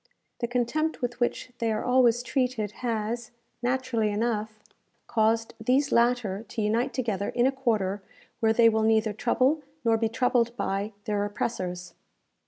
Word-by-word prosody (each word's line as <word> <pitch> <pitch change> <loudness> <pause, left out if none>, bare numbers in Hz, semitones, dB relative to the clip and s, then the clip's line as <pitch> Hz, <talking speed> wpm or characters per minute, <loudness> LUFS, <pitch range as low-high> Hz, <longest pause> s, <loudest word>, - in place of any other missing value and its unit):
The 235 - -1
contempt 250 +6 -1
with 245 0 -2
which 245 +1 -1
they 230 -1 +1
are 215 - -1
always 245 -1 +4
treated, 250 -5 -1
has, 230 0 -2 0.3
naturally 245 -3 0
enough, 215 0 -2 0.5
caused 225 +1 +1
these 270 +5 +2
latter 235 -4 +2
to 225 - -3
unite 230 +5 +1
together 220 -6 -2
in 240 - +1
a 265 - +4
quarter 215 -7 -1 0.4
where 220 -1 +3
they 230 +1 +5
will 220 -1 +3
neither 220 -1 +2
trouble, 255 +7 +1 0.2
nor 225 -1 +4
be 225 0 0
troubled 240 0 +1
by, 200 +1 -2
their 205 -1 0
oppressors. 185 -4 -3
230 Hz, 150 wpm, -27 LUFS, 215-245 Hz, 0.5 s, they